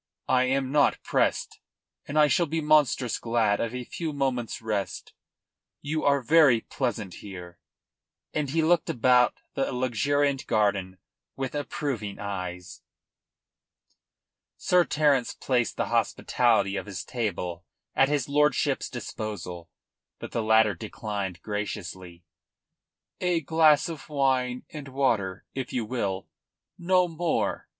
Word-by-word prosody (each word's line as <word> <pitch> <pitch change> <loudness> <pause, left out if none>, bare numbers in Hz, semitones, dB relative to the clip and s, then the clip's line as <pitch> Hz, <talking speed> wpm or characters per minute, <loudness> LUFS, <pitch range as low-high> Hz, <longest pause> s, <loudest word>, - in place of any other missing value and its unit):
I 130 0 +3
am 135 0 0
not 145 -1 +3
pressed, - - 0 0.5
and 145 - -3
I 150 - +7
shall 170 +3 +2
be 160 +2 -1
monstrous 150 -5 +2
glad 115 -3 +1
of 115 +1 -2
a 125 - -4
few 160 +5 -5
moments' 130 -4 -1
rest. 105 -3 -3 0.7
You 155 +2 -2
are 140 -2 +3
very 145 -5 +5
pleasant 115 -9 -3
here," 90 -3 -9 0.7
and 150 -2 -1
he 160 +3 +1
looked 170 +1 +2
about 125 0 +4 0.2
the 135 - -1
luxuriant 135 +3 0
garden 100 -4 +1 0.4
with 135 -1 -4
approving 140 -7 -3
eyes. 90 -3 -6 1.8
Sir 180 -1 +3
Terence 145 -5 +2
placed 125 -3 0
the - - -1
hospitality 105 -5 +2
of 95 - -5
his 95 -2 -6
table 90 -7 -3 0.3
at 135 - +4
his 145 -4 0
lordship's 150 -1 +1
disposal. 90 -6 -6 0.5
But - - -8
the 115 - -1
latter 110 -1 +4
declined 100 -2 -5
graciously. 95 -4 -5 1.0
"A 180 -2 +1
glass 155 -1 +4
of 160 -3 -8
wine 130 -3 0
and 150 -3 -7
water, 115 -9 0
if 130 -1 -4
you 120 -3 -1
will. 100 -5 -3 0.5
No 180 +1 +3
more. 165 0 -1
125 Hz, 125 wpm, -27 LUFS, 105-145 Hz, 1.8 s, I